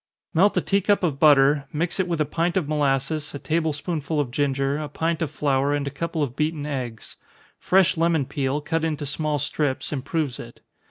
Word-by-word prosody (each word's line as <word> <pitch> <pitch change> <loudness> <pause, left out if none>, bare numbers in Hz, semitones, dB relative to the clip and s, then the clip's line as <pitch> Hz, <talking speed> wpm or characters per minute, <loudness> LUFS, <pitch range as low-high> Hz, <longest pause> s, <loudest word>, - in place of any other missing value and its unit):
_ - - -69 0.3
Melt 195 +5 +4
a - - +4
tea 200 0 +1
cup 205 0 +2
of 150 -6 0
butter 145 -1 +5
mix 165 +5 -2
it 185 - +1
with 170 -2 -2
a 155 - +2
pint 170 +4 -1
of 170 -6 0
molasses, 145 0 0
a - - -2
table 155 +3 0
spoonful 155 0 -3
of 135 -4 -1
ginger, 140 +1 0
a 150 -1 -5
pint 165 +3 -1
of 160 - 0
flour, 140 -1 +1
and 145 -1 -2
a 140 - -3
couple 160 +2 -2
of 125 -3 -4
beaten 155 -1 -1
eggs. 125 -6 -5 0.4
Fresh 185 -2 +3
lemon 165 -3 +2
peel, 140 +2 -2
cut 160 +2 -1
into 155 -2 -2
small 150 +1 -1
strips, 145 +1 -2
improves 140 0 -2
it. 120 0 -11
150 Hz, 210 wpm, -24 LUFS, 140-165 Hz, 0.4 s, butter